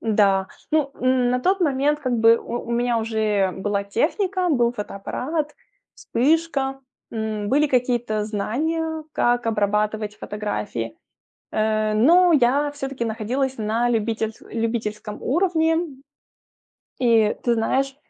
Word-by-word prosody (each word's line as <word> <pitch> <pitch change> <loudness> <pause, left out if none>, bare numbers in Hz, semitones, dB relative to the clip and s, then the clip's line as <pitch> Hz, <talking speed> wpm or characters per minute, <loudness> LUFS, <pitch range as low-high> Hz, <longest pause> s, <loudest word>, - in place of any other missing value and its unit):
да, 200 -3 +2 0.2
ну, 300 -3 +2
на 250 -1 +2
тот 380 +7 +1
момент 295 -1 +2
как 255 -4 -2
бы 230 0 +5
у 240 +1 -5
у - - -4
меня 235 0 +1
уже 215 -4 0
была 200 +1 -2
техника, 360 - 0
был 240 -5 +2
фотоаппарат, 270 +9 -4 0.4
вспышка, 275 0 0 0.3
м, 220 -2 -3
были 295 +3 +3
какие-то 240 -5 0
знания 315 +10 -2
как 240 0 +1
обрабатывать 210 0 0
фотографии. 205 - -4 0.6
Э, 215 0 +1
но 340 +11 +5
я 285 +1 +3
всё-таки 270 -4 -4
находилась 240 +4 -2
на 225 +3 0
любительс 225 -1 -1
любительском 225 -2 -4
уровне. 325 +1 +2 1.2
И 225 -4 +3
ты 240 - +3
знаешь, 265 +4 0
235 Hz, 115 wpm, -23 LUFS, 215-275 Hz, 1.2 s, бы